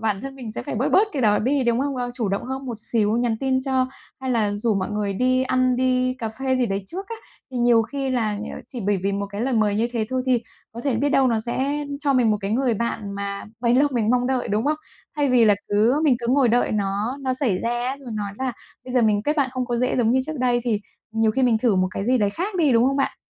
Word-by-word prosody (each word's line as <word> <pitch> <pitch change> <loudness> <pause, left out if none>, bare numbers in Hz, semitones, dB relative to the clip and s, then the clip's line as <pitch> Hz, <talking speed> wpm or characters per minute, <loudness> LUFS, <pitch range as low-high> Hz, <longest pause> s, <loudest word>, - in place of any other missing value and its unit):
bản 215 -3 -1
thân 270 0 -7
mình 245 -4 -7
sẽ - - -4
phải - - -5
bớt 245 +5 0
bớt 410 +3 +4
cái 270 - -1
đó 210 -1 +4
đi, 265 +3 +1
đúng 235 +1 +2
không? 275 -1 -1
Ơ, 245 -1 -2
chủ 235 -5 -1
động 195 +1 -2
hơn 265 +2 -5
một 235 -4 -5
xíu, 220 -1 +2
nhắn 235 -2 +1
tin 265 -1 +1
cho, 260 -1 +1 0.3
hay 260 - -3
là 220 -4 +1
rủ 215 +1 0
mọi 190 0 -2
người 210 -1 -1
đi 255 +4 +2
ăn, 255 -1 +2
đi 255 0 +1
cà 230 -3 -4
phê 260 +4 -1
gì 250 -1 +1
đấy 195 -1 -2
trước 385 - -6
á. 460 - -4 0.4
Thì 255 - -6
nhiều 240 -2 +4
khi 270 +3 -3
là 220 -5 0
nh - - -5 0.2
chỉ 250 - -7
bởi 205 -1 +2
vì 195 +1 0
một 200 0 -2
cái 200 +1 -6
lời 255 +2 0
mời 215 -2 +2
như 230 +2 +1
thế 225 -3 -1
thôi 255 0 0
thì 250 -3 +2 0.3
có 235 - -7
thể 265 0 0
biết 285 +4 +1
đâu 270 -2 +3
nó 230 -2 +1
sẽ 275 +5 -2 0.2
cho 285 -2 +2
mình 245 -4 +3
một 210 - +2
cái 195 0 -3
người 245 +1 +1
bạn 210 -2 -3
mà 200 0 -4 0.2
bấy 240 0 +3
lâu 285 +3 +4
mình 230 -3 +1
mong 250 0 +2
đợi, 260 -1 -1
đúng 210 +3 0
không? 300 +2 +1 0.4
Thay 290 -1 +2
vì 250 -2 +5
là 210 -2 +5
cứ 225 +8 +3
mình 270 -5 +4
cứ 240 - -4
ngồi 260 -1 +4
đợi 240 0 +2
nó 205 +4 -1
nó 260 -1 -1
xảy 235 -9 0
ra 240 +3 -1
rồi 255 -4 -9
nói 205 -2 -3
là 260 -1 -1 0.3
"Bây 255 - -7
giờ 250 - +4
mình 210 -2 +2
kết 300 +5 0
bạn 275 -2 +1
không 255 -1 -2
có 240 -1 -1
dễ 250 +2 0
giống 230 -2 +2
như 260 +1 +3
trước 310 -2 -5
đây", 245 -1 +2
thì 220 -4 0 0.3
nhiều 225 0 +2
khi 265 +5 0
mình 235 -3 +3
thử 225 -4 +2
một 185 0 +2
cái 195 - -4
gì 255 +1 +3
đấy 205 -2 +2
khác 375 - -4
đi, 305 -7 +3
đúng 230 +1 +4
không 275 +1 +1
bạn? 275 - 0
245 Hz, 290 wpm, -23 LUFS, 220-260 Hz, 0.4 s, vì